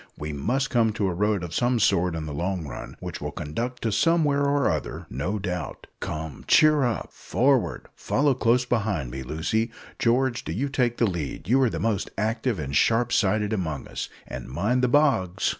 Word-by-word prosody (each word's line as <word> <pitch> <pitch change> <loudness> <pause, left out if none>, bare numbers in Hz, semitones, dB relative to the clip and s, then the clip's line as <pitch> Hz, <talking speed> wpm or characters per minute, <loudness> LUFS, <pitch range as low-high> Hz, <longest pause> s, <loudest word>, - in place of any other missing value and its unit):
We 75 0 -5
must 125 - -1
come 115 -4 +3
to 105 -2 0
a - - -2
road 105 0 +1
of 85 -1 -6
some 120 0 +2
sort 90 -4 +2
in 80 -1 -4
the 75 - -5
long 90 +2 -2
run, 65 - -7
which - - -6
will - - -3
conduct 120 +12 -4
to 115 - +1
somewhere 150 +3 +3
or 140 -1 +2
other, - - -4
no 85 - -2
doubt. 90 -3 -4
Come, 80 -2 -5
cheer 155 -1 +6
up; 120 -7 -1
forward! 130 -1 +1
Follow 140 0 +1
close 125 0 +2
behind 100 - -1
me, 65 +1 -5
Lucy. 80 - -1 0.3
George, 120 +1 +2
do - - -4
you 135 +10 -1
take 125 -4 0
the 115 - +3
lead 85 -4 -4
you 130 +5 +4
are 130 - +4
the 85 - -4
most 105 +1 0
active 110 +2 0
and 70 -3 -4
sharp 115 +8 +3
sighted 105 +2 +2
among 80 -9 -3
us; - - -5 0.2
and - - -7
mind 105 - 0
the 125 - +3
bogs." 125 - +2
110 Hz, 195 wpm, -25 LUFS, 85-125 Hz, 0.3 s, cheer